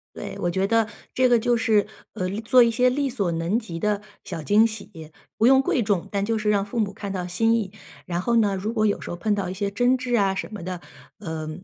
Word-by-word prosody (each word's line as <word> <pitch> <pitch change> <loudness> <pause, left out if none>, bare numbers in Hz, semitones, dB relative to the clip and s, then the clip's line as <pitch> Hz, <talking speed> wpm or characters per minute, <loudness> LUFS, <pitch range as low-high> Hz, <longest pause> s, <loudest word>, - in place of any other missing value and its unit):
对， - - -6
我 175 - 0
觉 190 +2 0
得 225 +1 +2 0.3
这 255 0 +3
个 240 -1 +5
就 240 +1 +1
是， 220 -2 +2 0.3
呃， 185 0 -2 0.2
做 250 +1 +6
一 235 - +2
些 250 +2 +3
力 275 +2 0
所 200 -9 -1
能 170 +8 0
及 190 -8 -7
的 205 +3 0 0.2
小 170 -4 -6
惊 210 +7 +4
喜， 205 -8 -7 0.3
不 225 - +3
用 265 +1 +6
贵 250 -3 +1
重， 195 -2 0
但 200 -1 -1
就 225 +1 0
是 215 0 -1
让 200 -1 +2
父 225 +3 -4
母 200 -2 0
看 200 -2 -6
到 180 -2 -3
心 225 +6 +2
意。 220 -5 0 0.4
然 175 0 -2
后 235 +3 +1
呢， 205 -3 +2
如 205 +4 -3
果 215 -2 +1
有 205 - 0
时 - - -7
候 175 - -5
碰 210 +3 0
到 195 -3 -2
一 - - -4
些 200 +1 -2
争 245 +5 +2
执 250 -1 -1
啊 195 -3 +2
什 - - -4
么 200 - -7
的， 180 0 -5 0.4
呃， 160 -1 -5
205 Hz, 275 characters per minute, -24 LUFS, 185-230 Hz, 0.4 s, 做